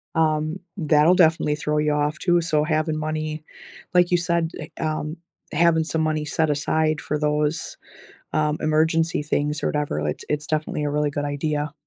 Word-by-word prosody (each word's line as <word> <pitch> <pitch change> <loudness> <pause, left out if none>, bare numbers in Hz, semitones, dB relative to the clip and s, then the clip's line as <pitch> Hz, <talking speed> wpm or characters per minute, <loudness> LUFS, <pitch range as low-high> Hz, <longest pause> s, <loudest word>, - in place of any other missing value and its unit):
um, 155 +2 +1 0.2
that'll 155 0 +4
definitely 160 -4 +3
throw 150 +1 -1
you 150 0 +1
off 150 +1 0
too, 175 -1 +3
so 155 -3 +1
having 155 0 0
money 155 0 -3 0.5
like 180 0 +4
you - - +5
said, 170 -1 0
eh 155 +1 -7
um, 155 +1 -2 0.4
having 165 0 +4
some 160 0 -1
money 155 -1 0
set 155 +1 0
aside 155 +1 +1
for 150 0 -2
those, 150 +1 -1 0.6
um, 155 -1 +1
emergency 160 0 +2
things 150 0 -1
or - - +2
whatever, 150 - -1
it 75 - -4
it's 150 0 -1
definitely 155 -1 -1
a 145 - 0
really 150 0 +1
good 145 0 -2
idea. 145 +1 -2
155 Hz, 170 wpm, -23 LUFS, 150-160 Hz, 0.6 s, you